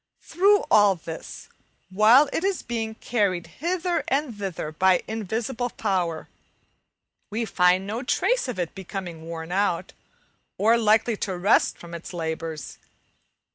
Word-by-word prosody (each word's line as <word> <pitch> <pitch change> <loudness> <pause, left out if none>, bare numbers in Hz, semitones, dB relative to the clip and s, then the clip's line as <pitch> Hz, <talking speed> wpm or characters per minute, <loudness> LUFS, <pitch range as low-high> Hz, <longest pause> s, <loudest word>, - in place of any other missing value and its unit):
Through 400 +4 +3
all 205 -2 +6
this, 165 -1 -9 0.4
while 225 +9 +6
it 330 - -1
is 390 -1 -1
being 225 -2 -3
carried 200 -7 -1 0.2
hither 350 +1 0
and 275 -3 -1
thither 190 -6 -4
by 185 +3 +3
invisible 225 +3 -3
power, 175 -7 -2 1.0
we 225 +2 -2
find 185 -2 +3
no 220 +4 -3
trace - - +1
of 250 - -4
its 175 -3 -3
becoming 185 -3 -7
worn 165 0 -7
out, 185 -2 0 0.6
or 225 +3 +4
likely 220 0 +3
to 190 -3 -3
rest 195 +5 +3
from 170 0 -12
its 170 +2 -8
labours. 160 -2 -5
205 Hz, 135 wpm, -25 LUFS, 175-235 Hz, 1.0 s, all